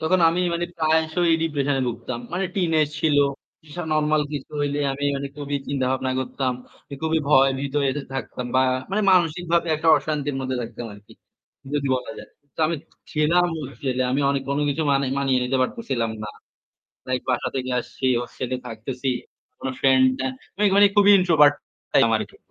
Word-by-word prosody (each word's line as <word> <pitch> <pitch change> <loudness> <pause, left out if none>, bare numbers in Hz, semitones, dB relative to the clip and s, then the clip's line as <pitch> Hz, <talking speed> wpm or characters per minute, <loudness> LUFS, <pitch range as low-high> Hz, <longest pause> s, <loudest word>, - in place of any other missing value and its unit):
তখন 160 +4 +2
আমি 170 +2 0
মানে 170 0 -1
প্রায়শই 160 +2 +2
ডিপ্রেশন 145 -3 0
এ - - 0
ভুগতাম। 120 +1 -5
মানে 185 +2 -1
টিনেজ 165 -6 +2
ছিল, 155 -2 +2 0.5
এসব 150 +2 -13 0.2
নরমাল 155 0 +2
কিছু 145 -3 -6
হইলে 145 0 -1
আমি 140 +1 -4
মানে 140 0 -4
খুবই 145 -1 -3
চিন্তা-ভাবনা 130 -1 0
করতাম। 130 0 -2 0.4
এ - - -2
খুবই 160 0 +1
ভয় 135 -2 +6
ভীত 140 0 -4 0.2
এতে 145 +2 -3
থাকতাম 125 -1 -4
বা 130 - +5 0.3
মানে 210 +2 +1
মানসিকভাবে 170 -1 +2
একটা 160 +1 0
অশান্তির 145 -2 -2
মধ্যে 130 -1 -2
থাকতাম 120 +1 -7
আরকি, 105 0 -15 0.6
যদি 140 -1 0
বলা 125 +2 -6
যায়। - - -10 0.3
তো - - -4
আমি 165 +1 -1
ছি - - -28 0.3
ছিলাম 170 +4 +3 0.3
ছেলে। 130 -2 0
আমি 135 - +1
অনে 140 0 +2
অন্য 140 - 0
কিছু 150 +3 -1
মানে 135 0 +2
মানিয়ে 135 -2 +2
নিতে 130 +1 0
পারতেছিলাম 130 - -2
না। 105 - -5 0.8
লাইক 130 0 0
বাসা 125 - 0
থেকে 130 -1 -2
আসছি, 130 +2 -5 0.2
হোস্টেলে 125 +1 -4
থাকতেছি। 125 +3 -5 0.5
কোনো 130 - -3
ফ্রেন্ড 130 -1 +5 0.2
না। 130 - 0 0.3
মেঘ 210 -1 +3
মানে 205 0 +8
খুবই 205 0 +6
ইন্ট্রোভার্ট 155 -5 +5 0.4
টাইপ - - +5
ছিলাম - - +3
আরকি। - - -7
145 Hz, 175 wpm, -23 LUFS, 130-160 Hz, 0.8 s, মানে